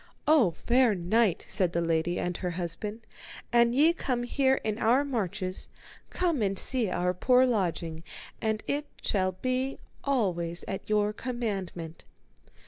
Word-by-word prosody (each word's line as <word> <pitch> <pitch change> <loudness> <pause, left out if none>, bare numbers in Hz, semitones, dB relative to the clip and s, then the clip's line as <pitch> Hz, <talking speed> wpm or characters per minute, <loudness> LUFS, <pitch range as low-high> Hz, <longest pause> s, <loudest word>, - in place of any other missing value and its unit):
O 295 - +6
fair 235 +6 +2
knight, 190 +2 +1
said 185 -3 +1
the 170 - +1
lady 165 +1 0
and 175 0 -2
her 180 - -2
husband, 185 +6 -4 0.5
an 235 0 +5
ye 305 +6 +5
come 250 -7 -2
here 265 +2 +2
in 215 0 -2
our 250 +6 +3
marches, 200 -7 -2 0.4
come 340 -8 0
and 195 -2 0
see 245 -3 0
our 180 0 0
poor 250 +7 +4
lodging, 170 -8 -1 0.4
and 220 -1 -1
it 290 +1 -2 0.2
shall 185 -2 +1
be 255 +7 -2 0.3
always 180 -11 -1
at 195 - -5
your 210 0 +2
commandment. 195 -9 -4
210 Hz, 140 wpm, -28 LUFS, 180-250 Hz, 0.5 s, O